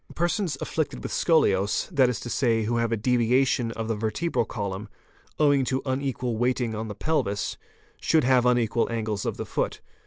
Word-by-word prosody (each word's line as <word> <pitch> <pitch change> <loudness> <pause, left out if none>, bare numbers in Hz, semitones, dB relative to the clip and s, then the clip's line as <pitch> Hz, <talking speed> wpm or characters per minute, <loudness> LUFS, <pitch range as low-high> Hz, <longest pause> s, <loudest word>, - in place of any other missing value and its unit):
Persons 175 0 0
afflicted 155 -2 -3
with - - -4
scoliose, 100 - +2
that 135 -6 +4
is 120 -4 -2
to 120 - -6
say, 115 -4 +2
who 120 +2 0
have 115 -1 0
a 115 - +1
deviation 125 +1 +2
of 115 -1 -4
the 115 - 0
vertebral 110 +7 -1
column, 100 -1 -5 0.5
owing 145 -3 +4
to 130 +1 -1
unequal 130 -3 -2
weighting 125 -1 0
on 110 +1 -4
the 105 - -6
pelvis, 100 -10 -1 0.5
should 160 -2 +3
haye 125 0 +4
unequal 120 -2 +2
angles 110 -3 -2
of - - -2
the - - -4
foot. - - -2
120 Hz, 180 wpm, -26 LUFS, 110-135 Hz, 0.5 s, that